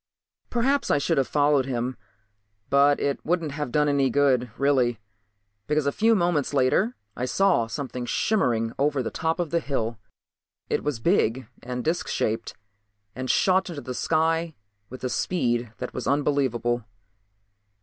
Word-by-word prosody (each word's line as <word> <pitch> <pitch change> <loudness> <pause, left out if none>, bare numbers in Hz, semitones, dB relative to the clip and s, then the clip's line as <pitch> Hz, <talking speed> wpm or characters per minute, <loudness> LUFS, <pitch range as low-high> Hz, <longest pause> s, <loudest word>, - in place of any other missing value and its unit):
Perhaps 270 +4 +1
I - - +4
should 140 - +1
have 135 - +1
followed 145 -2 +2
him, 125 0 -2 0.8
but 140 +1 +5
it 140 -1 -1
wouldn't 170 -2 0
have 145 -2 -4
done 150 +1 +2
any 140 -2 +2
good, 130 -2 +2
really. 130 -5 +2 0.7
Because 150 -1 +1
a 140 - +2
few 225 +7 +3
moments 170 -7 +1
later 145 - +2 0.2
I 125 - -2
saw 180 -6 +2
something 125 -1 -5
shimmering 120 - +1
over 140 -1 +1
the - - -4
top 160 +2 -1
of 175 -3 -2
the 170 - +2
hill. 115 -7 -3 0.7
It - - 0
was 145 -5 -2
big 130 - +1
and 125 0 -4
disc 165 +2 0
shaped 110 +1 -2 0.6
and 130 0 -5
shot 190 0 +3
into 155 -5 -6
the 130 - -5
sky 160 +3 0 0.3
with 130 +1 -10
a - - +1
speed 120 -4 -1
that - - -6
was - - -4
unbelievable. 130 -4 +1
140 Hz, 155 wpm, -25 LUFS, 125-160 Hz, 0.8 s, but